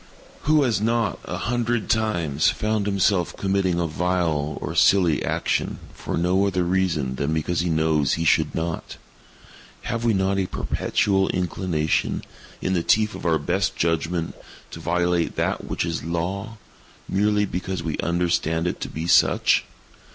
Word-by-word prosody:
Who 150 0 +4
has 115 -6 +1
not, 115 -3 0
a - - -4
hundred 120 -1 -1
times, 85 -10 +1
found 105 -1 -1
himself 100 -2 +1
committing 95 -3 0
a 85 - +1
vile 80 -3 -1
or - - -4
a - - -7
silly 85 -8 +4
action, - - -1 0.2
for - - -4
no 90 +4 +2
other 90 -2 0
reason 85 -8 0
than 75 +3 -1
because 80 +2 -1
he 85 - 0
knows 80 -3 +2
he 80 - -1
should - - +2
not? 80 0 -4 0.9
Have 115 0 -3
we 115 -3 +2
not 95 +1 +1
a 95 - 0
perpetual 95 +1 0
inclination, 85 -3 -1 0.4
in 95 - 0
the 90 - +1
teeth 105 +4 +2
of - - -4
our 80 -1 +3
best 75 - -1
judgment, 85 0 -1 0.4
to - - -8
violate 85 -1 0
that - - -1
which - - -2
is 85 -1 -3
Law, 95 +6 -3 0.5
merely 105 +1 +2
because 90 -2 -4
we 80 -2 -3
understand 85 -1 0
it 90 - -2
to - - -4
be 80 +1 -5
such? 85 - +4
90 Hz, 160 wpm, -23 LUFS, 80-100 Hz, 0.9 s, Who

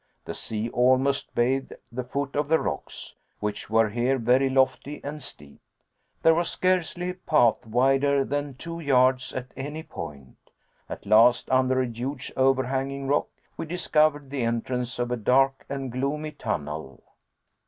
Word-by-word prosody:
The - - -5
sea 110 0 -3
almost 130 +3 +2
bathed 130 +3 +1 0.2
the 125 +2 -4
foot 140 +3 -4
of 145 0 0
the 160 +2 +4
rocks, 70 -4 -5 0.3
which 105 0 -4
were 110 0 +3
here 120 +5 +1
very 130 +3 +3
lofty 130 +2 +1
and 150 +2 -6
steep. 75 - -8 0.6
There 165 - +7
was 170 +1 0
scarcely 180 -1 0
a - - -7
path 135 - +2
wider 135 +4 +3
than 145 -1 -3
two 165 +5 -7
yards 130 -3 +3
at 130 0 -6
any 145 +4 -5
point. 75 - -9 0.5
At - - -7
last, 115 +5 +5
under 130 0 +3
a - - +1
huge 125 +3 -5
over 130 0 +3
hanging 135 +1 -3
rock, 145 - +2 0.3
we - - -4
discovered 155 -4 +1
the 140 -2 -2
entrance 120 +2 -2
of 120 0 -2
a 125 - 0
dark 135 +4 +2
and 135 -2 -4
gloomy 145 +5 -2
tunnel. 75 - -5
130 Hz, 155 wpm, -26 LUFS, 120-145 Hz, 0.6 s, There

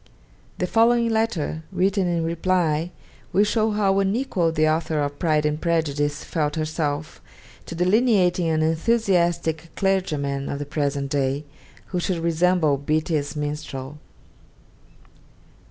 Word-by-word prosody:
The 180 - 0
following 230 +4 +3
letter, 220 -9 -1
written 190 0 +1
in 170 -1 0
reply, 165 -1 0 0.4
will 200 - +4
show 220 +1 +1
how 200 -2 +2
unequal 195 -4 0
the 155 -1 +2
author 155 0 0
of 145 0 -2
'Pride 155 -3 +1
and 150 +1 -1
Prejudice' 145 -3 0
felt 150 -2 -2
herself 155 -1 -3 0.5
to 170 - -6
delineating 185 -2 +2
an 155 -1 +1
enthusiastic 170 -3 +1
clergyman 150 -8 -1
of 140 - -3
the 145 - -4
present 140 -1 -2
day, 140 0 0 0.5
who 180 - -1
should 175 0 -1
resemble 165 -2 +2
Beattie's 155 0 -1
Minstrel: 150 -1 -5 1.0
'Dec. - - -27
165 Hz, 125 wpm, -23 LUFS, 150-185 Hz, 1.0 s, will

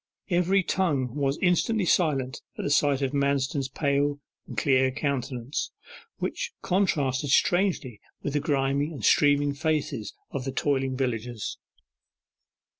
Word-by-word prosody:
Every 180 +2 +3
tongue 145 -11 0
was 140 0 0
instantly 185 +4 +2
silent 140 -7 +1 0.2
at - - -4
the 145 - -1
sight 145 -2 +3
of 135 - 0
Manston's 140 -1 0
pale 145 +1 0 0.3
and - - -9
clear 130 -2 +3
countenance, 130 -2 -2 0.5
which 480 -1 -3
contrasted 145 -8 +1
strangely 175 - +2 0.2
with 145 - -2
the 150 - +2
grimy 140 -1 +1
and 145 - -5
streaming 145 0 +4
faces 150 -8 -2 0.2
of 140 - -3
the 135 - -3
toiling 135 -1 0
villagers. 120 -4 -3
140 Hz, 125 wpm, -27 LUFS, 130-155 Hz, 0.5 s, streaming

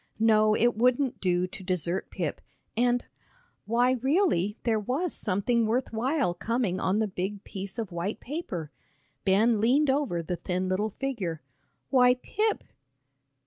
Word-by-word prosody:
No, 215 -1 +4
it 240 +1 +3
wouldn't 250 +3 +1
do 180 -1 +2
to 185 +1 -9
desert 180 0 0
Pip 165 -6 -3 0.3
and 245 +1 +2 0.6
why, 240 +3 +3
really 260 - +1
there 225 -2 +2
was 270 - -1
something 220 +3 +1
worth 240 +2 -1
while 255 - +1
coming 225 -2 -1
on 185 +2 +1
the 220 - +2
big 195 +1 -4
piece 195 0 -7
of 220 -5 -4
white 175 +5 -3
paper. 215 - -5 0.5
Ben 210 +3 +3
leaned 265 +5 +4
over 265 -12 0
the 175 +2 -3
thin 185 +1 -2
little 195 +4 0
figure. 205 - -4 0.5
"Why, 250 -2 +5
Pip!" 425 - -1
220 Hz, 145 wpm, -28 LUFS, 185-250 Hz, 0.6 s, Why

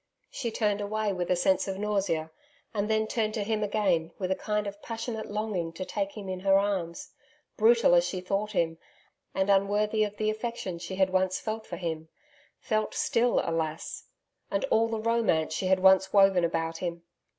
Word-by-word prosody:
She 260 - -3
turned 210 -2 0
away 210 0 -1
with 180 -1 -3
a 180 - +4
sense 190 +2 +2
of 190 -1 -3
nausea, 195 -6 -1 0.4
and 210 0 -1
then 220 0 +2
turned 215 -1 -1
to 215 - -1
him 215 +1 -1
again 195 -6 +1
with 185 -1 -2
a - - +3
kind 210 +1 -2
of 200 0 -7
passionate 225 -1 -5
longing 205 -5 -2
to 185 +2 -5
take 200 0 -3
him 200 -2 -6
in 185 -1 -3
her 195 +1 +4
arms 190 -4 -2 0.4
brutal 230 -3 +5
as 175 0 +6
she 185 +1 -3
thought 200 +3 -2
him, 165 -3 0 0.6
and 190 0 +1
unworthy 205 +2 +2
of 210 0 -4
the 215 0 +1
affection 215 -5 -4
she 175 +2 -6
had 190 0 +2
once 185 0 +1
felt 220 0 -4
for 175 - -5
him 160 -2 -4 0.5
felt 215 -2 -1
still 240 +1 +2
alas! 160 -1 -3 0.4
and - - 0
all 225 +1 +4
the 225 0 -2
romance 220 -9 +1
she 185 - -1
had 190 0 +3
once 190 0 +5
woven 195 -3 +5
about 165 -1 -1
him.... 170 -1 -4
195 Hz, 190 wpm, -28 LUFS, 180-215 Hz, 0.6 s, as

